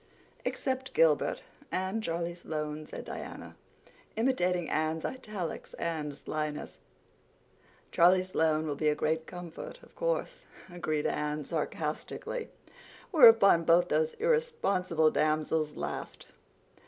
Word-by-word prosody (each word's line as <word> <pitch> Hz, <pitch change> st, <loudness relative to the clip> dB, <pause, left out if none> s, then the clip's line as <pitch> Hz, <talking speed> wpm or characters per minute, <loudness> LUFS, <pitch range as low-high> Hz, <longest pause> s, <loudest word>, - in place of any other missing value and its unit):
"Except 260 Hz, 0 st, -2 dB
Gilbert—and 235 Hz, -, 0 dB
Charlie 170 Hz, -2 st, -2 dB
Sloane," 155 Hz, -3 st, -5 dB
said -, -, -7 dB
Diana, -, -, -7 dB, 0.6 s
imitating 180 Hz, -8 st, +1 dB
Anne's 155 Hz, +1 st, -1 dB
italics 210 Hz, -9 st, -5 dB
and 150 Hz, -4 st, -3 dB
slyness. 150 Hz, -, -4 dB, 1.1 s
"Charlie 180 Hz, +2 st, +5 dB
Sloane 160 Hz, -4 st, +1 dB
will 150 Hz, -, -1 dB
be 155 Hz, +1 st, +1 dB
a 150 Hz, -, +1 dB
great 160 Hz, +1 st, -1 dB
comfort, 175 Hz, -2 st, -8 dB
of -, -, -18 dB
course," -, -, -2 dB, 0.3 s
agreed 155 Hz, -4 st, -1 dB
Anne 150 Hz, 0 st, -1 dB
sarcastically; 485 Hz, -3 st, -3 dB, 0.6 s
whereupon 225 Hz, -, +8 dB
both 170 Hz, +2 st, +4 dB
those 155 Hz, +1 st, +1 dB
irresponsible 305 Hz, -, +1 dB
damsels 155 Hz, 0 st, +1 dB
laughed. -, -, -5 dB
170 Hz, 105 wpm, -30 LUFS, 155-225 Hz, 1.1 s, whereupon